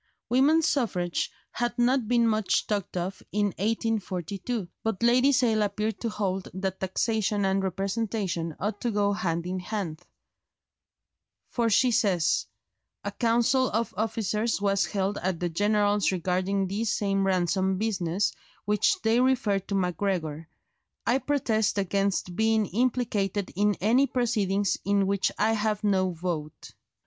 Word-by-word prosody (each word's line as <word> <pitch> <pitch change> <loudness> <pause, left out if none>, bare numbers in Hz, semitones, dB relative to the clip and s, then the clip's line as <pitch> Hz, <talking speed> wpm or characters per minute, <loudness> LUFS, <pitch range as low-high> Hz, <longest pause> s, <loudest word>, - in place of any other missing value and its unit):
Women's 290 +6 +4
suffrage 185 -11 0 0.2
had 240 0 -2
not 245 -1 +2
been 235 0 +3
much 215 -2 +1
talked 200 -3 -2
of 185 +2 -3
in 205 0 +1
1842, 205 -1 -2 0.2
but 225 -1 -2
Lady 250 +4 +5
Sale 235 -5 +2
appeared 210 +1 -1
to 230 - -1
hold 195 -3 -2
that 190 0 -3
taxation 205 +1 0
and 195 0 +1
representation 195 -3 -2
ought 205 +3 -3
to 240 - 0
go 205 -2 +1
hand 170 -5 -2
in 185 +1 -3
hand; 180 -5 -4 1.5
for 235 -2 +1
she 245 +4 +4
says, 185 -7 +2 0.6
"A - - -3
council 240 +2 +2
of 225 +2 -1
officers 220 0 -1
was 200 -1 +1
held 200 0 -1
at 180 -2 -2
the 175 - -1
General's 205 +2 +2
regarding 185 +2 0
this 215 +4 -1
same 195 -3 0
ransom 190 +1 +1
business, 195 -3 0 0.3
which 210 +1 +2
they 225 +2 +3
refer 245 -6 +2
to 200 +1 -5
Macgregor. 180 -4 -2 0.6
I 255 +3 +2
protest 230 -8 0
against 195 -2 0
being 220 0 +2
implicated 210 -3 -1
in 205 +1 +2
any 240 +8 +3
proceedings 205 -6 0
in 200 0 +2
which 195 0 +1
I 220 - +2
have 215 -1 -1
no 190 -2 +2
vote." 165 -3 -5
205 Hz, 135 wpm, -27 LUFS, 190-225 Hz, 1.5 s, Lady